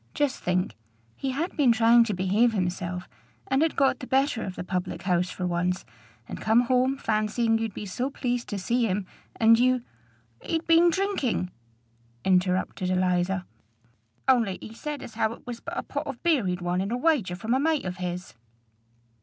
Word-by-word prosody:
Just 290 -2 0
think: 180 -6 0 0.4
he 270 - -3
had 305 +8 -2
been 275 -5 +4
trying 230 +1 +6
to 215 -4 -2
behave 200 +6 +2
himself, 180 -2 -2 0.4
and 270 +2 +1
had 325 0 +2
got 270 -2 +2
the 255 - -7
better 265 -3 +2
of 185 - -5
the - - -5
public 180 0 -3
house 180 -1 +1
for 180 - -4
once, 180 +1 -1 0.4
and - - -7
come 220 +2 +4
home 255 +2 +2
fancying 225 0 +1
you'd 225 -3 -3
be 210 - -5
so 245 +7 -2
pleased 245 -3 -2
to 205 - -3
see 235 +5 +1
him; 195 0 -1 0.3
and 225 0 +5
you" 255 0 +3 0.6
"He'd 325 0 -2
been 335 +1 +6
drinking," 335 - -1 0.7
interrupted 185 0 +1
Eliza. 185 0 +1 0.8
"Only 230 -8 +3
he 220 - -9
said 295 +4 -5
as 225 - -9
how 220 0 0
it - - -15
was 240 -1 -6
but 340 +6 -7
a - - -1
pot 295 +1 -4
of 270 -4 -6
beer 305 - +3
he'd 180 0 -2
won 175 +1 0
in 195 - -2
a 240 - -1
wager 250 - +1
from 220 +6 -2
a 260 - +3
mate 310 -2 +1
of 180 0 -4
his." 180 0 -5
225 Hz, 185 wpm, -26 LUFS, 185-260 Hz, 0.8 s, trying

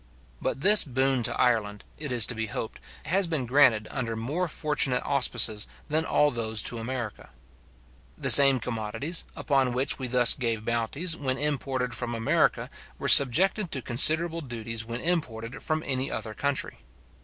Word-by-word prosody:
But 135 - -4
this 210 +5 +6
boon 130 -1 -1
to 115 - -4
Ireland, 110 -5 -1 0.2
it 150 -3 -5
is 120 -3 +3
to - - -3
be 110 -1 -5
hoped, 110 +1 -7 0.3
has 190 +2 0
been 155 -6 -3
granted 120 -4 +2
under 120 -5 -5
more 145 +11 -4
fortunate 150 -5 -1
auspices 115 -6 +1 0.2
than 155 +2 -1
all 150 -2 +1
those 110 -2 -3
to 120 - -2
America. 120 -2 -7 0.9
The - - +4
same 135 -2 +10
commodities, 115 +8 -4
upon 135 -4 -1
which 130 +3 0
we 130 - -4
thus 125 -1 +4
gave 115 -3 -4
bounties, 120 +9 -2
when 130 -4 -4
imported 135 -4 -3
from 120 -1 -5
America, 115 -1 -1 0.3
were - - -5
subjected 180 - +5
to 130 -3 -5
considerable 160 +7 +3
duties 115 -4 -5
when 115 +2 -7
imported 125 -9 -4
from 155 0 -3
any 130 -1 -3
other 110 - -6
country. 140 +3 -4
130 Hz, 160 wpm, -25 LUFS, 115-145 Hz, 0.9 s, same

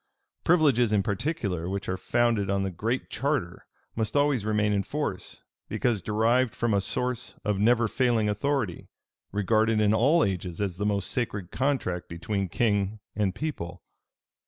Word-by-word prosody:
Privileges 140 -9 +4
in 105 -2 +3
particular, 100 - -2
which 100 0 -3
are 95 - -1
founded 115 -1 +1
on 100 0 +1
the 95 - -2
Great 115 +8 -2
Charter, 135 - -2 0.3
must 110 +5 -1
always 145 -7 +2
remain 105 -1 +2
in 100 - +2
force, - - -4 0.3
because 115 -5 0
derived 115 +5 +2
from 120 -2 0
a 100 - +3
source 125 +4 -3
of 105 -2 0
never 115 +2 +4
failing 120 -2 +1
authority, 105 -2 -1 0.4
regarded 110 +2 +2
in 105 0 +3
all 145 +9 +4
ages 90 -3 -2
as 95 -4 -2
the 105 - 0
most 100 -2 -1
sacred 105 -7 -3
contract 125 -10 -1
between 95 +3 -2
king 105 +1 0 0.2
and 100 -3 0
people. 90 - -5
105 Hz, 155 wpm, -27 LUFS, 100-120 Hz, 0.4 s, Privileges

